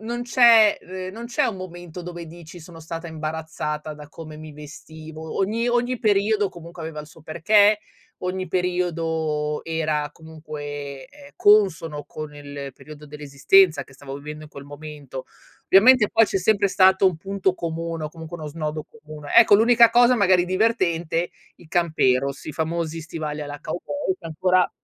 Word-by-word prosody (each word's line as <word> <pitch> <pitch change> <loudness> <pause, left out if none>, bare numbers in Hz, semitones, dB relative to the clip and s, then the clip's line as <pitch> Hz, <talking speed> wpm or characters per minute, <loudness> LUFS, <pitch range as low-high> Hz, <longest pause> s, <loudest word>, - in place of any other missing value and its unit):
non 235 +2 -4
c'è 235 -3 +6
ehm, 185 0 -7
non 230 +3 -7
c'è 240 - 0
un 205 - -2
momento 175 -1 -9
dove 175 -1 -8
dici: 170 +1 -12
"Sono 165 0 -12
stata 165 +1 -7
imbarazzata 155 -1 -5
da 150 -1 -12
come 155 -1 -10
mi 155 0 -10
vestivo." 155 +1 -10
Ogni 225 +5 0
ogni 245 +1 0
periodo 205 0 +2
comunque 170 -1 -11
aveva 160 -1 -6
il 150 - -11
suo 155 - -17
perché, 205 +6 +4 0.4
ogni 185 +1 -3
periodo 165 -4 -1
era 155 -2 -1
comunque, 145 -3 -8
ehm, 290 0 -16
consono 170 -8 +3
con 155 0 -8
il 145 -1 -8
periodo 150 +1 -13
dell'esistenza 150 +5 +3
che 135 - -19
stavo 135 0 -8
vivendo 150 +1 -8
in 150 - -15
quel 140 -2 -10
momento. 145 -2 -9 0.4
Ovviamente 215 +3 +6
poi 225 - +5
c'è 195 - -1
sempre 200 +1 +2
stato 190 0 +4
un 180 - +2
punto 195 +2 -1
comune 165 -1 -4
o - - -3
comunque 160 +1 -9
uno 155 - -7
snodo 155 0 -4
comune. 155 -9 -10
Ecco, 215 -3 +8
l'unica 235 +1 +6
cosa 240 +1 +5
magari 185 -5 +3
divertente, 180 -4 0 0.3
i 175 - -17
camperos, 140 -6 +1
i 155 - -6
famosi 165 +1 -3
stivali 155 -2 -5
alla 145 0 -6
cowboy 190 - -3
che 170 - -10
ancora 180 +3 +2
165 Hz, 160 wpm, -23 LUFS, 150-195 Hz, 0.4 s, Ecco